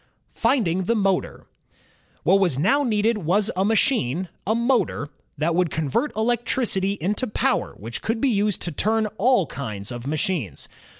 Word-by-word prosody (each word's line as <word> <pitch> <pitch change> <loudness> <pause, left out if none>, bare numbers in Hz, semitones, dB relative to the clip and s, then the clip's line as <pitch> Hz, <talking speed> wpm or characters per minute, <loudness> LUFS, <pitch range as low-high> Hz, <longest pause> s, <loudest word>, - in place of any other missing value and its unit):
Finding 190 -8 +1
the 230 - +1
Motor 195 -3 0 0.8
What 190 +4 +4
was 175 -9 +1
now 210 - +3
needed 225 -3 +1
was 200 +6 +1
a 190 - +1
machine, 190 - +1 0.2
a 220 - +2
motor, 235 - 0 0.3
that 160 +3 +1
would 180 0 +2
convert 160 - -1
electricity 225 -3 0
into 210 +9 -1
power 210 - 0
which 115 +4 -6
could 225 +1 -1
be 275 - +2
used 205 -3 0
to 175 - -3
turn 220 +8 +1
all 240 -3 +4
kinds 110 -7 -6
of 120 +1 -6
machines. 150 - -2
195 Hz, 155 wpm, -23 LUFS, 160-225 Hz, 0.8 s, What